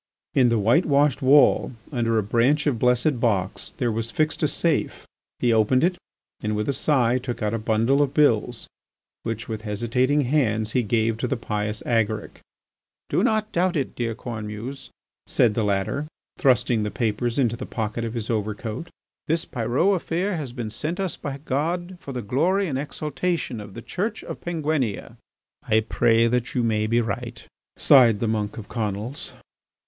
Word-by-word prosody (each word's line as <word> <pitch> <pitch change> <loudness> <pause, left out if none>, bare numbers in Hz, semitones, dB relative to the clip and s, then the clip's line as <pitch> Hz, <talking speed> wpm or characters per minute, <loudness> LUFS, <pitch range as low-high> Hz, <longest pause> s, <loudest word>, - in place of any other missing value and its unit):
In 125 -3 +4
the 115 - +2
whitewashed 140 - +3
wall 135 0 +5 0.2
under 115 -4 +1
a 110 - +2
branch 120 +8 +2
of 135 -7 +1
blessed 125 +2 +2
box, 100 -6 -1
there 120 -2 0
was 115 +1 -2
fixed 155 +5 0
a 155 - +3
safe. 165 +3 0 0.3
He 120 -1 +2
opened 115 +4 +3
it, 180 +1 +3 0.5
and 105 0 -1
with 105 0 -2
a 140 - +1
sigh 130 -3 +2
took 125 -3 -5
out 105 +1 0
a 115 - -1
bundle 115 +6 +2
of 140 -2 +1
bills 120 -5 +2 0.6
which, 115 -1 -4
with 110 -2 -4
hesitating 120 +7 +1
hands, 115 -6 +1
he 125 - +2
gave 115 0 0
to - - -1
the 135 - -1
pious 105 -1 -3
Agaric. 110 -2 -1 0.7
"Do - - +2
not 215 0 +1
doubt 180 +1 +1
it, 135 - -2
dear 115 -2 -2
Cornemuse," 110 +3 -6 0.4
said 115 -3 +3
the 115 - 0
latter, 100 +9 -1 0.3
thrusting 125 -4 +3
the 105 - -1
papers 115 +1 -1
into 120 -4 +2
the - - -7
pocket 110 0 -3
of 115 0 -4
his 115 -2 -3
overcoat, 110 +6 -3 0.4
"this 165 +2 0
Pyrot 130 - +1
affair 180 +3 -1
has 145 -6 -4
been 120 -3 -5
sent 150 - -2
us 190 -4 -1
by 140 -1 -5
God 175 +6 -2
for 140 - -7
the 125 -3 -4
glory 175 - +1
and 135 -4 -2
exaltation 150 -3 -3
of 100 -2 -11
the 115 - -8
Church 205 - -3
of - - -7
Penguinia." 155 - -2 0.4
"I 110 +1 +2
pray 115 +1 +3
that 125 +1 0
you 125 - +2
may 110 -2 +1
be 115 +2 +2
right!" 115 +1 -5 0.3
sighed 120 -6 +6
the 115 - 0
monk 105 -2 -2
of 110 - -7
Conils. 110 +3 -4
120 Hz, 175 wpm, -24 LUFS, 110-145 Hz, 0.7 s, sighed